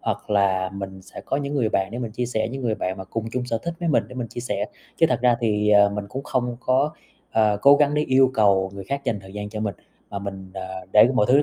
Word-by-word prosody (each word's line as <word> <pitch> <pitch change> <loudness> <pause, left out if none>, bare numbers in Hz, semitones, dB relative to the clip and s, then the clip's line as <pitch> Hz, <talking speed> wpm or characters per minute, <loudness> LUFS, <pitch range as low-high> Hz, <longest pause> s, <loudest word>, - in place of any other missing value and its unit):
Hoặc - - -3
là 95 -2 +2
mình 95 -1 -7
sẽ - - -10
có - - -2
những 140 0 -3
người 125 -6 +1
bạn 95 -2 0
để 120 - -4
mình 115 -3 -4
chia 120 +2 -2
sẻ, 110 -2 -1
những 135 +1 -5
người 115 -3 0
bạn 95 -3 -3
mà 95 - -6
cùng 110 +3 -4
chung 125 -1 -2
sở 115 -2 -2
thích 170 +9 -5
với 170 - -1
mình 150 - +3
để 125 - -11
mình 120 -3 -4
chia - - -6
sẻ, 105 -5 -2 0.3
chứ 165 - +5
thật - - +1
ra 120 -1 +4
thì, 105 -2 +1
ờ, 100 -1 +6
mình 105 0 -4
cũng 135 +6 -5
không 125 -3 -2
có, 135 +4 +2 0.4
ờ, 105 -2 +3
cố 140 +1 +8
gắng 145 0 +3
để 150 - +2
yêu 130 -2 +4
cầu 95 -4 +3
người 100 -1 -7
khác 140 +5 -4
dành 110 -6 -1
thời 95 0 -13
gian 105 0 -5
cho 105 0 -6
mình, 105 -3 -2 0.4
mà 100 - -4
mình, 95 -1 -7
ờ, 95 -1 -7
để 105 +2 +7
mọi 105 -5 +3
thứ 140 +3 +6
110 Hz, 285 wpm, -23 LUFS, 100-130 Hz, 0.4 s, cố